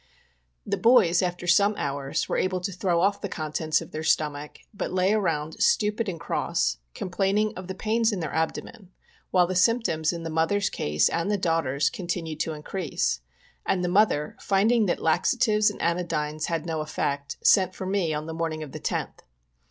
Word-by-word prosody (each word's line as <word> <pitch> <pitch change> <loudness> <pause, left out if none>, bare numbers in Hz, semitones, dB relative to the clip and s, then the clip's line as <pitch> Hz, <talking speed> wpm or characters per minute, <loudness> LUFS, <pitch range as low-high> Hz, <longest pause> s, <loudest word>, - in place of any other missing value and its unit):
The - - -2
bovs, 220 -8 +5
after 175 -1 -2
some 200 +4 +4
hours, 140 -1 -2
were - - -1
able 185 0 0
to 190 - -3
throw 180 -2 0
off 200 +2 +1
the 200 - -4
con 155 -3 -5
tents 155 0 +1
of - - -14
their 155 - -4
stomach, 150 -2 -1 0.2
but 200 - -4
lay 185 +2 +2
around 160 -7 -1
stupid 220 - +2
and 170 -3 -5
cross, 65 - 0
and - - -45
complaining 195 +3 0
of 185 0 -8
the 190 - -5
pains 225 +3 +1
in 200 - -3
their 160 -4 -4
abdomen, 175 +5 -3 0.4
while 180 -1 +4
the 185 - -3
symp 230 +6 +3
toms 160 -5 0
in 170 -1 -6
the 165 - -4
mother's 165 +6 +1
case 75 +1 +1
and 170 +4 -1
the 210 - +1
daughters' 160 -6 +1
continued 170 -7 -4
to 160 - -1
increase; 150 - -2 0.4
and 180 -2 0
the 180 - 0
mother, 180 -6 +2
finding 215 +3 +2
that 175 - 0
laxatives 215 +5 +3
and 210 - -9
anodynes 155 -3 -1
had 165 -2 -2
no 160 -2 -2
effect, 145 -1 -3
sent 185 -2 +4
for 190 - -5
me 185 -4 0
on 150 0 -3
the 160 - -6
morning 160 -1 -3
of 145 - -9
the - - -7
10th. - - -3
175 Hz, 195 wpm, -26 LUFS, 155-200 Hz, 0.4 s, bovs